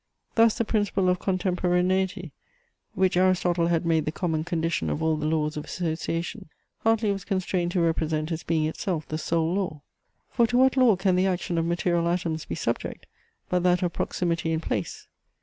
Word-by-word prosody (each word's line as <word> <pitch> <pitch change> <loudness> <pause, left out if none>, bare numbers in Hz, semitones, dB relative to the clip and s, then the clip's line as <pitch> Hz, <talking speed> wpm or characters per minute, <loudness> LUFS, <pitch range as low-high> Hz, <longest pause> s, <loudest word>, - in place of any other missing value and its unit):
Thus 230 -1 +4
the 230 - 0
principle 205 -4 +1
of 180 0 +1
contemporaneity, 185 -1 0 0.6
which 190 -1 +2
Aristotle 180 -2 +2
had 170 -1 +1
made 160 -2 +2
the 155 - -1
common 160 -2 -1
condition 165 -1 -1
of 155 - -2
all 160 0 +2
the 150 0 -2
laws 155 -1 0
of 150 - -5
association, 165 -1 -3 0.3
Hartley 225 -1 +2
was 195 -2 -3
constrained 185 -3 -1
to 180 - +2
represent 160 -1 0
as 165 0 -2
being 160 -2 0
itself 160 0 -3
the 155 - -3
sole 165 +1 0
law. 175 -7 -3 0.5
For 235 -2 +3
to 245 - +1
what 260 +1 +4
law 250 -6 +5
can 190 0 +1
the 185 +1 +3
action 175 -2 -1
of 165 - 0
material 170 0 +1
atoms 170 -3 -1
be - - -4
subject, 115 - -3 0.4
but 180 0 +1
that 180 0 +2
of 175 -2 -1
proximity 170 -2 -1
in 160 - 0
place? 105 - -4
175 Hz, 185 wpm, -26 LUFS, 160-185 Hz, 0.6 s, law